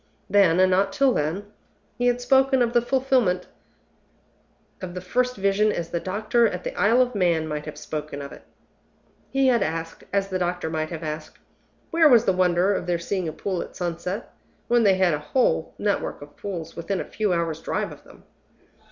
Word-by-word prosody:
Then, 185 -4 +4
and 185 0 +5
not 195 +1 +2
till 270 +1 +3
then, 160 +6 -2 0.5
he 245 0 0
had 245 0 +2
spoken 265 0 +3
of 235 0 -1
the 240 - +4
fulfillment 245 -7 +1 1.4
of 180 -1 -6
the - - -3
first 250 +7 0
Vision 200 +2 +2
as 170 -4 -4
the 170 - -1
doctor 215 +6 +1
at 180 -3 -5
the - - -5
Isle 225 +7 +4
of 250 0 -5
Man 170 -6 +1
might 150 -1 -4
have 150 - -7
spoken 150 -2 -5
of 140 0 -7
it. - - -12 0.9
He 270 0 +1
had 240 -2 +3
asked, 165 +1 -3
as 195 0 0
the 185 -1 -2
doctor 175 -2 -2
might 155 -1 -2
have 165 -1 -6
asked, 155 0 -6 0.5
Where 330 -2 +5
was 240 -3 +6
the 190 - +3
wonder 180 +1 +2
of 180 -2 -3
their 175 -1 +1
seeing 180 +1 -3
a - - -2
pool 185 +3 -3
at - - -9
sunset, 180 +4 -4 0.3
when 240 0 +3
they 200 -4 +5
had 185 -3 +3
a 150 - -1
whole 160 - 0
network 205 -7 -2
of 145 0 -15
pools 170 -5 -6
within 180 +3 -3
a - - -3
few 215 -3 -1
hours' 170 -2 -1
drive - - -2
of - - -13
them? - - -18
185 Hz, 200 wpm, -24 LUFS, 170-230 Hz, 1.4 s, was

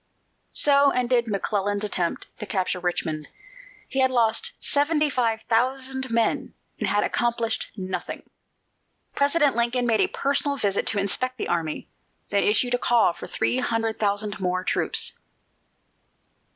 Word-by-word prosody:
So 280 -1 +5
ended 245 -2 +1
McClellan's 205 0 -1
attempt 180 -5 -1
to 210 - -6
capture 185 -3 -1
Richmond. 160 -3 -2 0.6
He 270 - -3
had 260 0 +4
lost 235 -3 +1
seventy 300 +1 +2
five 230 -4 0
thousand 260 +2 0
men 230 -1 0 0.2
and - - -1
had 205 - +1
accomplished 235 -1 0
nothing. 185 -2 -5 0.9
President 285 -1 +2
Lincoln 240 +1 0
made 225 -3 +2
a - - +3
personal 280 +1 -1
visit 200 -5 0
to 205 - +2
inspect 255 +6 0
the - - -3
army, 165 -3 -2 0.4
then 200 0 +2
issued 245 +4 +2
a 245 - +1
call 235 -8 +3
for - - -9
three 255 - 0
hundred 225 -2 -1
thousand 205 -1 -1
more 185 -1 -1
troops. - - +1
230 Hz, 140 wpm, -24 LUFS, 200-255 Hz, 0.9 s, So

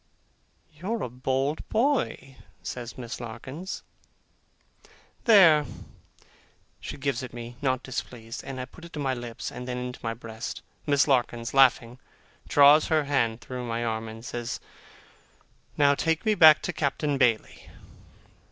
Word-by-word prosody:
'You're 200 +9 -3
a - - -3
bold 135 +4 -1
boy,' 225 - 0 0.3
says 120 -1 -6
Miss 120 -2 -6
Larkins. 130 +10 -7 1.4
'There.' 170 - +7 1.1
She - - -7
gives 135 -2 -1
it 125 -2 -8
me, 120 0 -8
not 130 -2 0
displeased; 120 -2 -6
and 135 -1 -6
I 125 - -3
put 165 +7 -16
it 170 - -12
to 150 - -5
my 135 -2 0
lips, 120 -2 -6
and 125 - -7
then 125 0 -3
into 125 0 -5
my 115 0 -3
breast. 115 0 -7 0.2
Miss 145 0 +3
Larkins, 120 -3 0
laughing, 125 -2 +4 0.5
draws 145 +2 +6
her 155 -1 +2
hand 120 -5 0
through 125 -1 -6
my 115 +1 -2
arm, 110 0 -2
and 110 +1 -9
says, 120 -1 -4 1.2
'Now 140 -1 +5
take 160 +5 0
me 215 - +4
back 160 -6 +7
to - - -2
Captain 145 -1 -1
Bailey. 115 -4 0
130 Hz, 145 wpm, -27 LUFS, 120-150 Hz, 1.4 s, There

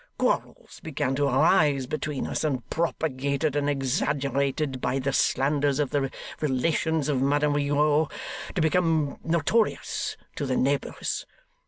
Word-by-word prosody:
Quarrels - - -2
began 135 -4 -2
to 140 +1 +1
arise 140 0 +3
between 150 +1 -3
us; - - -2
and, 130 -6 -1
propagated 145 -3 -1
and 145 0 +1
exaggerated 140 0 0
by 125 +2 0
the 135 0 -1
slanders 140 0 +2
of 145 -3 0
the 135 -2 0 0.3
relations 150 +2 0
of 140 -4 +1
Madame 145 +2 +2
Rigaud, 145 +1 +2 0.5
to 180 - +1
become 160 -2 +1
notorious 170 +7 0 0.2
to 140 - -2
the 130 - 0
neighbours. 140 +2 -1
145 Hz, 130 wpm, -26 LUFS, 135-155 Hz, 0.5 s, arise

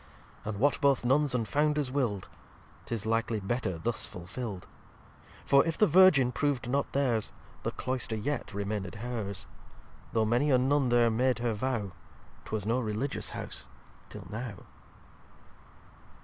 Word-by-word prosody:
And 105 -1 -3
what 140 +7 +2
both 140 -3 +3
Nuns 135 +1 +3
and 115 -3 0
Founders 150 -1 +1
will'd 120 -9 -1 0.6
'Tis 115 -3 -3
likely 115 0 0
better 95 -3 -2
thus 115 +7 -1
fulfill'd, 95 +3 -6 0.8
For 140 0 +6
if 165 -1 -2
the 215 - +6
Virgin 165 -8 +6
prov'd 140 -3 -1
not 140 +3 0
theirs, 125 -6 +1 0.3
The - - -1
Cloyster 130 -3 -2
yet 125 +5 -3
remained 100 -1 -3
hers. 110 -3 -4 0.7
Though 110 -1 +2
many 120 +7 +2
a 130 - +5
Nun 135 +1 +2
there 120 -1 +4
made 125 +3 +2
her 120 -1 0
vow, 110 -3 -2 0.5
'Twas 110 -2 -3
no 115 +4 +1
Religious 115 +4 -2
House - - -4 0.4
till - - -9
now. 110 -3 -6
120 Hz, 140 wpm, -30 LUFS, 110-135 Hz, 0.8 s, For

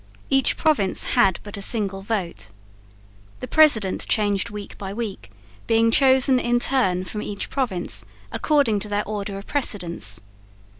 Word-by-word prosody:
Each 270 -1 +2
province 290 -12 +1
had 190 -2 +3
but 205 0 -8
a - - -6
single 195 -2 +1
vote. 195 - -4 0.9
The - - -6
president 235 -12 +3
changed 205 -3 +1
week 205 -1 -8
by 195 0 -6
week, 210 - -6 0.4
being 225 0 +3
chosen 265 0 +4
in 240 0 +1
turn 190 -9 +2
from 210 +3 -5
each 200 -1 -6
province 225 -10 -1 0.3
according 280 -9 +1
to 210 - -7
their 205 0 -2
order 205 -1 -4
of 200 - -9
precedence. 175 - -1
210 Hz, 145 wpm, -22 LUFS, 195-240 Hz, 0.9 s, chosen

